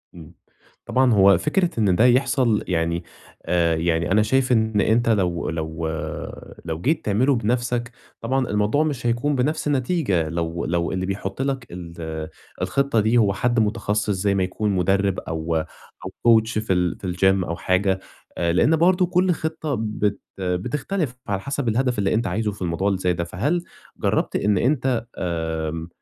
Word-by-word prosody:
إمم. 80 -3 -12 0.5
طبعًا 130 -2 +3
هو 100 -2 +6
فكرة 170 - +1
إن 100 -5 +3
ده 115 - +4
يحصل 125 -3 +3
يعني، 85 -1 0 0.4
آآ، 85 -2 +2
يعني 85 +1 0
أنا 105 +2 +5
شايف 130 +3 +1
إن 110 -3 +2
أنت 115 +3 +2
لو 90 -5 +1
لو 80 0 -3 0.8
لو 80 0 -4
جيت 155 - 0
تعمله 125 +7 +2
بنفسك، 120 +1 -1 0.3
طبعًا 130 +2 0
الموضوع 105 +9 +2
مش 140 -6 -3
هيكون 120 +5 +1
بنفس 150 +4 0
النتيجة 130 - 0
لو 85 0 -3
لو 85 0 -1
اللي 95 0 -2
بيحُط 95 +3 -4
لَك 135 -2 -2
ال 85 -3 -6 0.3
الخطة 140 -4 +1
دي 110 +3 +3
هو 105 -4 +3
حد 120 +3 +1
متخصص، 105 -1 0
زي 100 0 +1
ما 95 - +2
يكون 100 +3 -1
مُدرِّب 95 +1 +1
أو 80 +1 -3
أو 80 0 -6 0.3
coach 110 0 -3
في 110 -3 0
ال 90 -1 0
في 95 - -5
الجيم 95 +1 +2
أو 85 - -3
حاجة، 95 +2 +1 0.4
آآ، 85 -1 +1
لأن 150 - +4
برضه 180 +3 +3
كل 180 +1 +2
خطة 160 -3 -2
بت 105 -2 -1 0.2
بتختلف 130 - -2
على 100 -1 -1
حسب 140 +2 -3
الهدف 125 0 0
اللي 95 -1 +1
أنت 115 -1 0
عايزه 105 +3 -1
في 100 - -13
الموضوع 90 +2 -1
اللي 100 -2 +1
زي 90 -1 +1
ده. 85 - -2
فهل 145 - -1 0.3
جربت - - 0
إن 105 -2 +2
أنت 125 -1 +1
آآ، 80 -2 -3
105 Hz, 170 wpm, -23 LUFS, 90-125 Hz, 0.8 s, هو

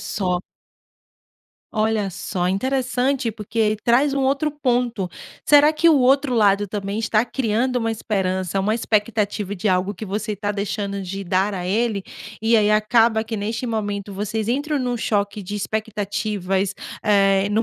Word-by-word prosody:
só. 180 -3 -1 1.3
Olha 215 -2 +1
só. 180 0 -3
Interessante, 255 +4 0
porque 215 0 -1
traz 270 +4 +3
um 280 - 0
outro 275 +3 +1
ponto. 245 -8 -1 0.4
Será 295 +1 +6
que 320 +2 +3
o 320 - +6
outro 270 +1 +3
lado 205 -2 +3
também 200 +1 -3
está 220 0 +2
criando 245 0 0
uma 225 -2 0
esperança, 190 -4 -1
uma 210 +3 +1
expectativa 210 -3 0
de 195 +4 -1
algo 185 +1 +1
que 220 - -7
você 210 +1 -3
tá 205 +1 -2
deixando 200 -1 -3
de 195 +2 -5
dar 190 +3 +1
a 180 -2 -4
ele? 210 0 0 0.4
E 225 +1 +3
aí 210 -1 +3
acaba 220 +1 +3
que, 225 0 -4
neste 220 +4 -3
momento, 205 -3 -3
vocês 210 +2 -3
entram 290 +4 0
num 250 -2 -1
choque 205 -2 -1
de 200 +2 -5
expectativas, 205 -2 -2 0.3
eh, 195 -2 +3
no 215 +2 +2
215 Hz, 155 wpm, -22 LUFS, 200-235 Hz, 1.3 s, Será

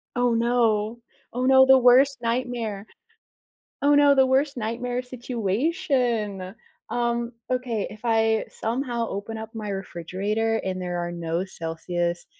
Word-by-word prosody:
Oh, 245 -1 +2
no. 230 -1 +1 0.3
Oh, 250 +1 -1
no, 265 0 +7
the 265 0 +7
worst 255 +2 +5
nightmare. 230 -4 -2 1.0
Oh, 290 +1 +5
no, 285 -1 +6
the 265 -1 +5
worst 275 +2 +1
nightmare 245 +2 -3
situation. 240 - -1 0.4
Um, 235 0 -1 0.2
okay, 250 -5 -1
if 215 - -11
I 225 -1 +2
somehow 235 0 -2
open 205 +3 -5
up 220 0 -7
my 215 -2 -5
refrigerator 200 +4 -2
and 185 -1 -3
there 175 -1 -3
are 175 0 -3
no 170 +1 -2
Celsius 175 0 -3
230 Hz, 130 wpm, -25 LUFS, 200-250 Hz, 1.0 s, no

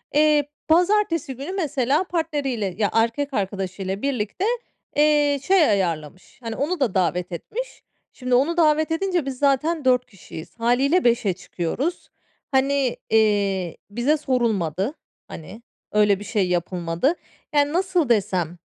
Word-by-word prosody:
Eee, 300 -1 +4 0.2
pazartesi 340 -5 +2
günü 280 +8 -6
mesela 295 -5 0
partneriyle, 285 - -2
ya, 210 -2 +1
erkek 235 +6 0
arkadaşıyla 195 -1 -3
birlikte, 270 - -2 0.5
eee, 295 -1 +3
şey 375 -2 +4
ayarlamış. 175 -4 -2
Hani, 225 -1 -4
onu 320 +7 -1
da 250 -9 +1
davet 180 -1 0
etmiş. 475 - -6 0.3
Şimdi, 255 -1 -1
onu 310 +7 +2
davet 315 -1 +3
edince 355 -1 0
biz 270 -2 -4
zaten 290 +2 +1
4 250 -1 +3
kişiyiz. 185 -7 -11
Hâliyle 265 +9 +2
5'e 235 -5 +2
çıkıyoruz. 185 - -4 0.4
Hani, 270 -1 +2 0.2
eee, 200 -5 +2
bize 245 +8 +1
sorulmadı. 225 - 0 0.3
Hani, 200 +8 -10 0.3
öyle 205 -2 +3
bir 205 - -8
şey 200 -5 0
yapılmadı. 175 - 0 0.4
Yani, 290 +1 +3
nasıl 360 -5 +1
desem, 185 -6 0
255 Hz, 130 wpm, -23 LUFS, 200-300 Hz, 0.5 s, Eee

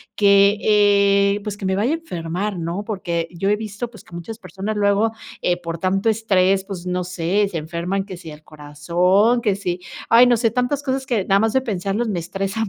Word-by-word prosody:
que, 200 0 +5
eh, 200 -1 +3
pues, 205 -2 -5
que 195 - -6
me 190 0 +1
vaya 225 +8 +1
a - - +2
enfermar, 185 - -4
¿no? 170 +5 -3
Porque 170 -6 -3
yo 195 +3 -2
he 210 - +2
visto, 220 +2 -5
pues, 220 - -14
que 170 - -13
muchas 215 +7 -7
personas 195 +3 -5
luego, 205 +2 +2 0.3
eh, 175 0 +1
por 165 -1 -5
tanto 195 +4 0
estrés, 195 -3 +2
pues 190 -3 -8
no 180 0 -1
sé, 180 +3 0
se 170 - -3
enferman, 170 +5 -3
que 190 -2 -8
sí 170 -3 -10
el 150 +1 -13
corazón, 175 +10 +1
que 210 -4 +1
sí 180 -2 -3 0.3
ay, 235 +2 +7
no 240 -1 +4
sé, 230 0 +2
tantas 250 +4 -1
cosas 265 0 -2
que 230 -7 -1
nada 195 0 +3
más 225 -1 +2
de 265 - +4
pensarlos 205 0 -2
me 185 -5 -1
estresa 195 +5 -3
200 Hz, 215 wpm, -21 LUFS, 180-215 Hz, 0.3 s, ay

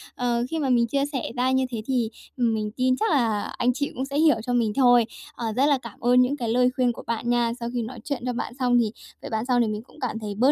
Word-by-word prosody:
Ờ, 240 -1 0
khi 325 - -2
mà 275 -3 0
mình 235 -2 +3
chia 275 +3 0
sẻ 285 -3 -4
ra 255 +1 +1
như 260 0 +2
thế 230 -3 -4
thì 245 -4 0 0.3
mình 220 -3 0
tin 255 0 +3
chắc 445 - +1
là 225 -7 +2 0.2
anh 245 +1 +2
chị 285 +2 -2
cũng 260 +2 -2
sẽ 280 +1 -4
hiểu 315 -2 +5
cho 245 - -1
mình 225 -3 +1
thôi. 245 -3 +5 0.3
Ờ, 235 - -5
rất 265 - +3
là 290 -1 +4
cảm 235 -4 -11
ơn 250 +1 +4
những 270 +4 +1
cái 235 -4 -2
lời 250 +2 +3
khuyên 250 -3 +2
của - - -9
bạn 235 +1 -2
nha. 240 -1 +2
Sau 235 0 -3
khi 240 - -1
nói 230 +1 -6
chuyện 280 -4 -4
cho 250 - -1
bạn 240 - -4
xong 245 -1 +3
thì 220 -3 +1 0.3
với - - -7
bạn 220 +1 -2
xong 245 -2 +2
thì 230 - +2
mình 215 0 -3
cũng 305 - -19
cảm 230 -4 -3
thấy 205 -2 -5
bớt 255 +6 +4
245 Hz, 290 wpm, -25 LUFS, 235-260 Hz, 0.3 s, hiểu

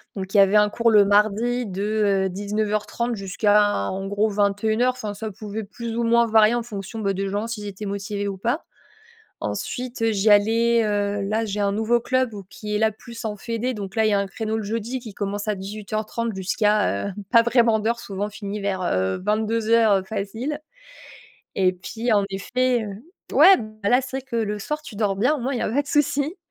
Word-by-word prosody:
Donc 190 -1 -6
il 210 - +3
y - - +8
avait 195 +1 +5
un 210 0 +4
cours 230 +2 +2
le 210 -2 +6
mardi 215 +4 +2
de, 195 +1 -4 0.4
heu, - - 0
19:30 210 +4 -2
jusqu'à 205 - +2
en 195 +1 -4
gros 205 +2 +1
21:00. 215 +4 +1
Enfin 215 -5 -5
ça 215 +2 -5
pouvait 215 +2 -6
plus 230 +3 -6
ou 235 - 0
moins 235 0 +4
varier 220 0 +5
en 240 - -1
fonction, 210 -1 -7
beh, 200 -3 0
des 195 +1 -2
gens 205 +3 -2
s'ils 215 -3 -5
étaient 200 +1 -7
motivés 200 0 -3
ou 195 -1 -4
pas. 240 - -1 0.8
Ensuite, 250 -1 -4
heu, 225 -1 +3
j'y 210 +1 +2
allais, 230 +3 +4
heu, 205 -1 0
là, 220 +2 0
j'ai 210 -1 -4
un 200 -1 +1
nouveau 225 +3 +2
club 255 0 0
où 200 -2 -8
qui 210 +2 -5
est - - +1
là 220 0 +2
plus 230 +1 -11
en 215 - -2
fédération 235 +4 -3
donc 200 -1 -7
là 220 - +3
il - - +3
y - - +1
a 200 - +3
un 200 - -3
créneau 220 +2 -3
le 220 - -2
jeudi 230 +4 -3
qui 220 -4 -10
commence 205 +1 -3
à 210 - 0
18:30 215 +3 -4
jusqu'à, 205 - +1
heu, 200 - -5 0.2
pas 230 -1 +7
vraiment 235 -2 +3
d'heure 230 +2 0
souvent 200 -2 -4
on 210 - -8
finit 205 0 -6
vers, 195 -2 -2
heu, 95 - 0
22:00, 220 +2 +2
heu, 195 - +1
facile 220 +9 -4 1.0
et 185 -1 +3
puis 225 +6 -3
en 205 - +4
effet, 245 +4 0
heu 205 +1 -8 0.3
ouais, 385 - +9
beh, 215 -2 -5
là 250 +3 +5
c'est 265 +1 -5
que 245 -3 -5
le 210 -2 -1
soir 300 +8 -4
tu 245 -7 -10
dors 200 -2 0
bien 250 +10 +2
au 295 - -4
moins 260 +3 -2
il 250 - -1
y - - -2
a - - 0
pas 275 +6 +1
de 285 - -14
souci. 290 +3 +1
215 Hz, 220 wpm, -23 LUFS, 200-235 Hz, 1.0 s, ouais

